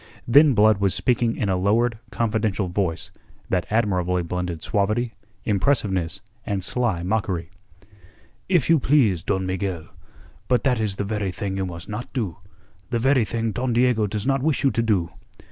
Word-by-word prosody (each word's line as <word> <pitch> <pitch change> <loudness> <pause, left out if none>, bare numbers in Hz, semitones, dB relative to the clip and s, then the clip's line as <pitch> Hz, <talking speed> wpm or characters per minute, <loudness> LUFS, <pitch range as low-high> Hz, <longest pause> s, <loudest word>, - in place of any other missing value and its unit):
Then 140 +3 +6
Blood 105 -1 +5
was 100 -2 +1
speaking 120 -2 +1
in 105 - -1
a 95 - +1
lowered, 110 +5 +1
confidential 110 -4 -1
voice 90 -2 -2 0.4
that 90 -2 0
admirably 90 -5 +1
blended 85 -1 -4
suavity, 110 +3 0 0.3
impressiveness, 100 - 0 0.2
and 100 -3 -2
sly 105 -5 -1
mockery. 95 -4 -2 1.0
"If 175 -8 +3
you 165 -2 +5
please, 120 - +3
Don 95 +2 -1
Miguel, 95 -3 -3 0.6
but 125 -3 +2
that 125 -4 +2
is 105 -3 -1
the 100 - -2
very 105 -1 -2
thing 95 +2 -4
you 95 -1 -2
must 85 -2 -8
not 105 +3 -6
do 110 -10 -2 0.5
the 120 - 0
very 130 0 +3
thing 115 +2 -2
Don 125 +2 -1
Diego 120 -3 +3
does 105 +1 -3
not 135 0 +1
wish 150 0 0
you 135 - +4
to 115 - 0
do. 100 -7 +1
105 Hz, 165 wpm, -23 LUFS, 95-120 Hz, 1.0 s, Then